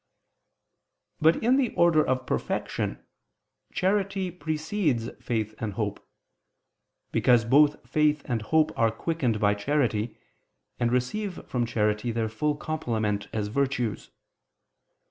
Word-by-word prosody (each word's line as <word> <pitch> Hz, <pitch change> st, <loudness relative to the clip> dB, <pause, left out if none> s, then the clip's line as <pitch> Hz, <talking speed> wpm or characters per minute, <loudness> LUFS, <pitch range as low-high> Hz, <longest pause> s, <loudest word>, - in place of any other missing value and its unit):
But 160 Hz, +5 st, +3 dB
in 250 Hz, +4 st, +4 dB
the 260 Hz, -4 st, +2 dB
order 170 Hz, -3 st, +5 dB
of 130 Hz, 0 st, -1 dB
perfection, -, -, -2 dB, 0.7 s
charity 195 Hz, -1 st, 0 dB
precedes 155 Hz, -, -1 dB
faith 110 Hz, -3 st, -1 dB
and 110 Hz, -3 st, -3 dB
hope: 105 Hz, -2 st, -4 dB, 1.0 s
because 120 Hz, -2 st, +4 dB
both 145 Hz, +5 st, +4 dB
faith 150 Hz, -1 st, +2 dB
and 120 Hz, -4 st, -1 dB
hope 155 Hz, +8 st, +2 dB
are 115 Hz, -, +3 dB
quickened 120 Hz, -2 st, -1 dB
by 105 Hz, -1 st, +3 dB
charity, 115 Hz, -1 st, 0 dB, 0.6 s
and 120 Hz, -1 st, +1 dB
receive 180 Hz, +11 st, -2 dB
from 120 Hz, -2 st, -1 dB
charity 105 Hz, +1 st, 0 dB
their 115 Hz, -1 st, -1 dB
full 150 Hz, +7 st, -1 dB
complement 110 Hz, -10 st, -2 dB
as 105 Hz, -2 st, -2 dB
virtues. 125 Hz, -3 st, -1 dB
125 Hz, 115 wpm, -27 LUFS, 110-155 Hz, 1.0 s, order